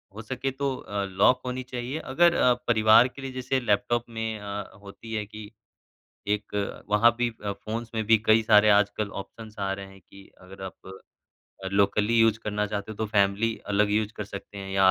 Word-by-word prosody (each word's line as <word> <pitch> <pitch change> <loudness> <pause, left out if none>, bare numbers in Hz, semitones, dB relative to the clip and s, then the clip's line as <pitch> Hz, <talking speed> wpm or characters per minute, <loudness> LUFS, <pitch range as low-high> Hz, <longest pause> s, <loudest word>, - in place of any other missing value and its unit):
हो 110 - -6
सके 130 +3 -3
तो 135 0 -2
अ, 100 -4 -4
लॉक 100 +7 +3
होनी 125 0 -3
चाहिए, 125 +4 -5
अगर 170 +6 +3
अ, 125 - +4
परिवार 110 +1 +6
के 135 +2 -12
लिए 135 -1 -5
जैसे 130 +1 -1
लैपटॉप 120 +1 0
में 110 -1 -4
अ, 100 0 -6
होती 100 +3 -10
है 105 -1 -2
कि, 105 0 -11 0.8
एक 105 0 -2 0.3
वहाँ 105 +3 +4
भी 120 - +2 0.2
अ, 100 - -1
फ़ोन्स 110 +3 -6
में 110 - -1
भी 110 -1 +5
कई 110 +1 +5
सारे 105 -1 +5
आजकल 105 0 +2
ऑप्शन्स 110 +1 -12
आ 95 -1 -1
रहे 100 0 -6
हैं, 95 0 -16
कि 100 +2 -16
अगर 95 +1 -12
आप 95 - -6 0.9
अ, - - -3
लोकली 105 +3 +2
यूज़ 115 -1 +4
करना 105 0 -1
चाहते 105 +1 -4
हो, 105 - -12
तो 110 - -2
फैमिली 105 +2 +1
अलग 105 0 +2
यूज़ 105 +1 0
कर 105 - -4
सकते 100 0 -9
हैं, 95 0 -7
या 95 -1 +5
110 Hz, 200 wpm, -26 LUFS, 100-120 Hz, 0.9 s, परिवार